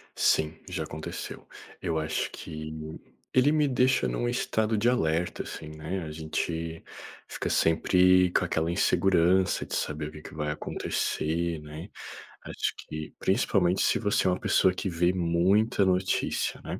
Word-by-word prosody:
Sim, 80 0 +2
já - - -3
aconteceu. 80 +1 -7 0.3
Eu 85 -3 -1
acho 80 +1 -1
que 80 0 -7 0.3
ele 130 +3 +5
me 150 -2 +3
deixa 130 0 +2
num 120 - -1
estado 110 -2 0
de 115 +4 +3
alerta, 85 -7 0
assim, 75 - -8
né? 80 +4 -5
A 80 - -6
gente 80 +1 -3 0.4
fica - - -4
sempre 90 +2 +4
com - - +2
aquela 80 -2 0
insegurança 90 0 +2
de - - -8
saber 75 0 -2
o - - -13
que 75 0 -11
que - - -11
vai 75 -1 -2
acontecer, 80 +2 -2
né. 75 +5 -9 0.5
Acho - - -2
que, 75 0 -7
principalmente 95 -1 +2
se - - +2
você 105 -3 +1
é - - +5
uma 90 - -1
pessoa 95 -1 +3
que 95 +1 -3
vê 85 +1 +1
muita 95 +5 +2
notícia, 95 0 0
né. - - -5
85 Hz, 155 wpm, -28 LUFS, 80-95 Hz, 0.5 s, ele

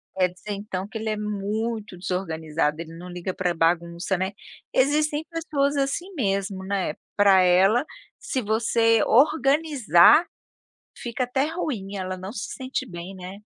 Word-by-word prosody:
Quer 185 -1 +2
dizer, 195 +3 -9
então 195 -1 -5
que 220 - -6
ele 220 0 -3
é 215 - -1
muito 210 0 -3
desorganizado, 160 -4 -2
ele 165 0 -9
não 180 +1 -9
liga 180 +1 -4
pra 180 -1 -1
bagunça, 170 +2 0
né, 190 +2 -1 0.4
existem 295 +3 +2
pessoas 295 -4 -1
assim 280 +7 -1
mesmo, 195 - -1
né, 190 -5 -1 0.2
pra 200 -2 +6
ela 190 +8 +4 0.3
se 260 - -3
você 225 +1 +2
organizar, 280 - +5 0.7
fica 240 +1 -3
até 265 +3 0
ruim, 245 - -4
ela 185 0 -4
não 190 +2 -7
se 220 0 -5
sente 260 0 -4
bem, 175 +2 -8
né. 185 +2 -9
205 Hz, 145 wpm, -24 LUFS, 185-255 Hz, 0.7 s, pra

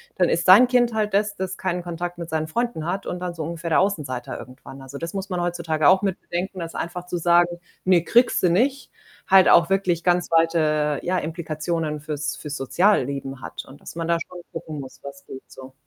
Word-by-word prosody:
dann 180 - +2
ist 170 - 0
dein 210 +7 +9
Kind 240 -2 +2
halt 210 -2 0
das, 205 0 +1
das 190 0 -4
keinen 180 -1 -2
Kontakt 175 0 -5
mit 170 -1 -6
seinen 155 -1 -1
Freunden 235 -2 -2
hat 190 +2 -3
und 180 - -4
dann 180 -1 -4
so 160 - -4
ungefähr 165 +1 -5
der 155 - +4
Außenseiter 150 -11 -2
irgendwann. 135 +1 -12
Also, 135 +1 -9
das 165 +4 -5
muss 195 0 -4
man 180 -2 -2
heutzutage 165 -3 0
auch 190 0 +5
mit 195 -3 -1
bedenken, 180 +3 -4
dass 165 -1 -6
einfach 175 +1 -5
zu 180 0 -3
sagen: 175 +1 +3 0.2
„Ne, 180 -3 +4
kriegst 240 +5 +3
du 180 - +4
nicht“, 265 +10 +1 0.4
halt 190 -1 +6
auch 170 +1 +6
wirklich 185 -3 +1
ganz 175 -1 +2
weite, 155 -3 +2
ja, 185 +1 0
Implikationen 155 -1 -3
fürs 150 0 -4
fürs 150 -1 -6
Sozialleben 135 -4 0
hat - - -7
und 135 - -14
dass - - -11
man 165 -1 -3
da 170 0 +2
schon 180 -1 -10
gucken 160 -3 -6
muss, 130 -2 -10
was 140 0 -10
geht 130 - -9
so. 130 0 -12
170 Hz, 215 wpm, -23 LUFS, 155-185 Hz, 0.4 s, dein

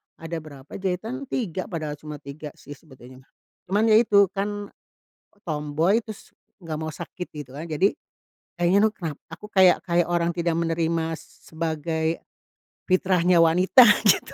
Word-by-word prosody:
Ada 165 +1 -6
berapa 145 -3 -14
jahitan, 205 +8 -3
3 190 -9 -3
padahal 155 -5 -5
cuma 150 -1 -9
3 145 +1 -9
sih 145 - -15
sebetulnya. 130 -3 -16 0.4
Cuman 210 +4 +2
ya 215 - +7
itu 200 -4 +4
kan 205 +1 -4 0.8
tomboy 155 +5 +1
tus 220 -3 -11 0.3
nggak 155 -2 -5
mau 160 0 -4
sakit 180 +3 -7
gitu 150 -4 -9
kan 155 +4 -6
jadi, 185 +7 +2 0.6
kayaknya 175 +3 +3
nuh - - -10
kena 165 -7 -4 0.2
aku 210 - -10
kayak 185 -2 +5
kayak 175 -1 +1
orang 170 -1 +1
tidak 170 -1 0
menerima 165 -1 -1
sebagai, 160 0 -3 0.7
fitrahnya 180 -1 +3
wanita 180 +9 +6 0.2
gitu. 185 - +3
170 Hz, 140 wpm, -24 LUFS, 155-190 Hz, 0.8 s, ya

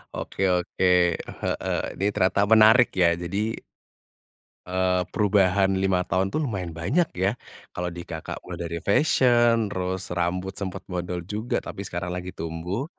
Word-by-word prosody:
Oke - - -6
oke, 90 +1 -1 0.6
heeh, - - -1 0.2
ini 100 - -2
ternyata 95 0 +2
menarik 110 +3 +7
ya 85 - +6
jadi 90 +3 -4 1.3
eee, 90 0 +1
perubahan 100 -2 +2
5 95 -1 +1
tahun 95 +2 0
tuh 155 +7 -1
lumayan 95 -8 -3
banyak 100 - 0
ya. 95 +3 +1 0.4
Kalau 90 0 -3
di, 85 0 -8
Kakak, 80 -1 -6
mulai 90 -2 -7
dari 85 - -3
fashion 120 - +3
terus, 95 -1 -3
rambut 90 +2 -1
sempet 95 -1 -6
bondol 90 -1 -4
juga. 105 +5 -2
Tapi 100 - -6
sekarang 90 -1 -4
lagi 90 0 -5
tumbuh 90 - -4
95 Hz, 145 wpm, -25 LUFS, 90-100 Hz, 1.3 s, menarik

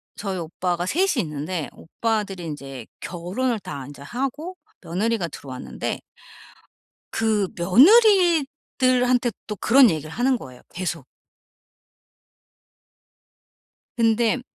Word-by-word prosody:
저희 195 -2 -4
오빠가 175 +1 -2
3 350 - +1
이 - - +3
있는데 155 +1 -4
오빠들이 200 -1 -3
인제 135 -6 -7
결혼을 205 +7 -2
다 140 -7 -7
인제 140 0 -12
하고 275 - -4 0.3
며느리가 190 +2 -1
들어왔는데 130 -5 -6 1.1
그 215 -4 +1
며느리들한테 270 - +4 0.2
또 210 - -4
그런 250 +4 +6
얘기를 155 -1 -4
하는 250 +6 +1
거예요 125 - -11
계속. 180 0 -4 2.9
근데 230 +1 +2
210 Hz, 220 characters per minute, -23 LUFS, 170-255 Hz, 2.9 s, 그런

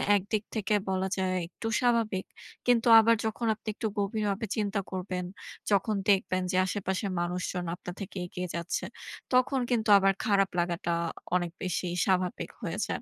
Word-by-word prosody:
একদিক 205 +2 0
থেকে 215 0 0 0.2
বলা 190 0 0
যায় 185 -1 0
একটু 225 +5 -7
স্বাভাবিক। 230 -6 +1 0.4
কিন্তু 240 -1 +4
আবার 230 +1 +5
যখন 220 +2 -2
আপনি 215 - -17
একটু 220 - -2
গভীরভাবে 205 +1 -1
চিন্তা 205 -2 0
করবেন, 185 -1 -3 0.5
যখন 205 +2 +2
দেখবেন 185 -1 +3
যে - - -2
আশেপাশের 190 0 -2
মানুষজন 180 0 -2
আপনার 180 0 -8
থেকে 195 0 -6
এগিয়ে 180 +1 -5
যাচ্ছে, 170 0 -2 0.5
তখন 255 +1 +3
কিন্তু 225 -2 +1
আবার 195 0 +4
খারাপ 195 -2 +3
লাগাটা 170 0 -1 0.4
অনেক 175 -2 0
বেশি 185 0 -1 0.2
স্বাভাবিক 185 -2 0
হয়ে 170 +4 -3
যায়। - - -3
195 Hz, 150 wpm, -29 LUFS, 180-220 Hz, 0.5 s, আবার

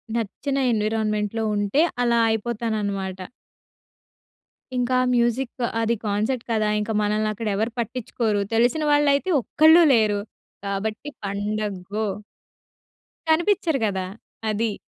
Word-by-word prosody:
నచ్చిన 255 +5 -2 0.2
ఎన్విరాన్మెంట్‌లో 215 0 -1
ఉంటే 205 +9 +1 0.2
అలా 235 -1 +2
అయిపోతాననమాట. 210 -4 -2 1.6
ఇంకా 250 +1 0
ఆ - - +1
మ్యూజిక్ 240 +1 +1 0.3
అది 230 +1 +1
కాన్సర్ట్ 215 +5 -1
కదా! 215 -1 +1
ఇంకా 220 +1 -2
మనల్ని 215 +1 0
అక్కడ 220 +1 -5
ఎవరు 220 +3 -1
పట్టించ్చుకోరు. 230 -3 -1
తెలిసిన 245 +7 +2
వాళ్ళైతే 290 +4 +3
ఒక్కళ్ళు 320 +7 +6
లేరు. 215 -3 +3 0.5
కాబట్టి 215 +7 -3 0.2
పండగ్గో. 205 0 -3 1.2
కనిపిచ్చరు 335 -3 +2
గదా! 190 -2 -2 0.4
అది. 215 0 -1
220 Hz, 100 wpm, -23 LUFS, 210-245 Hz, 1.6 s, ఒక్కళ్ళు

